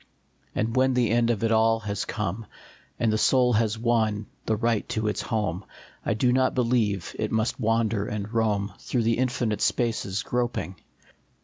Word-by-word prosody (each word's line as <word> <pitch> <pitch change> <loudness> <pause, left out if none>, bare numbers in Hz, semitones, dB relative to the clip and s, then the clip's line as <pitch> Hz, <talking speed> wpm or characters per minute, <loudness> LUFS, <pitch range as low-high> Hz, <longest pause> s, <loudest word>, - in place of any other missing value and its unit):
And 115 +1 -1
when 130 0 +3
the 120 -4 +2
end 120 0 +3
of 115 -2 0
it 115 - +2
all 115 0 +3
has 105 -1 -3
come, 105 0 -3 0.5
And 110 -2 +2
the 110 - +1
soul 125 +1 +4
has 110 0 +1
won 110 -2 +1 0.2
the 110 - +2
right 115 0 0
to 110 0 -1
its 105 - -1
home, 100 -5 -2 0.4
I 115 - 0
do 125 +3 +2
not 130 0 +2
believe 115 -7 0
it - - -1
must 110 +1 0
wander 115 -2 +1
and 105 +1 -4
roam 105 -3 0
Through 120 -3 -1
the 115 +1 +1
infinite 120 -4 0
spaces 110 -5 0
groping. 120 -7 -2
110 Hz, 175 wpm, -26 LUFS, 105-120 Hz, 0.5 s, soul